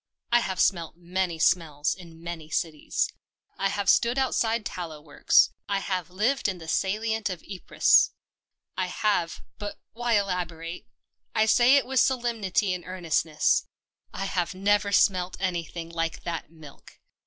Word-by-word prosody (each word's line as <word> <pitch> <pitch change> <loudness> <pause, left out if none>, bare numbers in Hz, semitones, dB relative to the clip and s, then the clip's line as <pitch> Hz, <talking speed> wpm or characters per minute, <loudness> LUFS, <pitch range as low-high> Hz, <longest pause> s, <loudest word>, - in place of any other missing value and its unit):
I 240 - +6
have 190 -5 -3
smelt 170 -5 +1
many 175 0 -2
smells 160 -3 +1
in 165 -3 -13
many 170 -2 -6
cities: 160 -2 -1 0.5
I 195 - +2
have 200 0 -2
stood 235 +6 +4
outside 230 -4 +1
tallow 165 -4 -5
works. 150 -1 +3 0.2
I 200 - +1
have 185 -3 -3
lived 220 +9 +1
in 190 -2 -2
the 165 -2 -11
salient 215 +5 0
of 180 -4 -6
Ypres. 190 -3 +3 0.7
I 185 -1 -1
have 180 -3 0
— - - -49
but 205 0 -6
why 240 +1 -1
elaborate? 175 -4 -2 0.5
I 220 - +4
say 245 +4 +5
it 280 - +3
with 260 0 +1
solemnity 225 -7 +1
and 180 -1 -5
earnestness: 165 -4 +1 0.4
I 195 - -4
have 185 -1 -1
never 200 +1 +2
smelt 185 -2 +2
anything 170 -2 -3
like 165 -1 -3
that 170 -3 -4
milk 155 -3 -15
185 Hz, 150 wpm, -26 LUFS, 165-205 Hz, 0.7 s, I